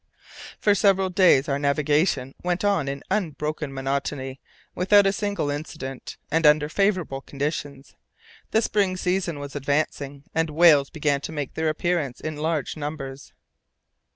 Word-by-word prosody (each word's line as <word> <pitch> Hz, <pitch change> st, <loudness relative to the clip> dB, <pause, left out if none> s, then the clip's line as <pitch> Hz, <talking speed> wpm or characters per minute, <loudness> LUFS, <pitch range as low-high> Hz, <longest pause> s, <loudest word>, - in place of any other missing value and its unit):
For 205 Hz, -, +4 dB
several 195 Hz, -1 st, +3 dB
days 175 Hz, -7 st, +5 dB
our 140 Hz, -1 st, 0 dB
navigation 145 Hz, -1 st, +1 dB
went 180 Hz, +2 st, -1 dB
on 195 Hz, -9 st, +2 dB
in 140 Hz, 0 st, -4 dB
unbroken 155 Hz, -6 st, -2 dB
monotony, 135 Hz, 0 st, -3 dB, 0.3 s
without 200 Hz, +2 st, +4 dB
a 195 Hz, -, +3 dB
single 205 Hz, -8 st, -2 dB
incident, 145 Hz, -3 st, -6 dB
and 165 Hz, +2 st, +2 dB
under 150 Hz, 0 st, +4 dB
favourable 185 Hz, -8 st, 0 dB
conditions. 140 Hz, -1 st, -5 dB, 0.5 s
The 220 Hz, -, +2 dB
spring 195 Hz, -4 st, +1 dB
season 180 Hz, -3 st, -1 dB
was 145 Hz, 0 st, -8 dB
advancing, 140 Hz, 0 st, -2 dB
and 160 Hz, 0 st, +1 dB
whales 150 Hz, -3 st, +5 dB
began 145 Hz, -3 st, 0 dB
to 155 Hz, -, -6 dB
make 145 Hz, -4 st, -4 dB
their 160 Hz, 0 st, 0 dB
appearance 155 Hz, -5 st, -1 dB
in 155 Hz, -1 st, -5 dB
large 155 Hz, -2 st, -1 dB
numbers. 145 Hz, -3 st, -6 dB
150 Hz, 140 wpm, -24 LUFS, 140-180 Hz, 0.5 s, days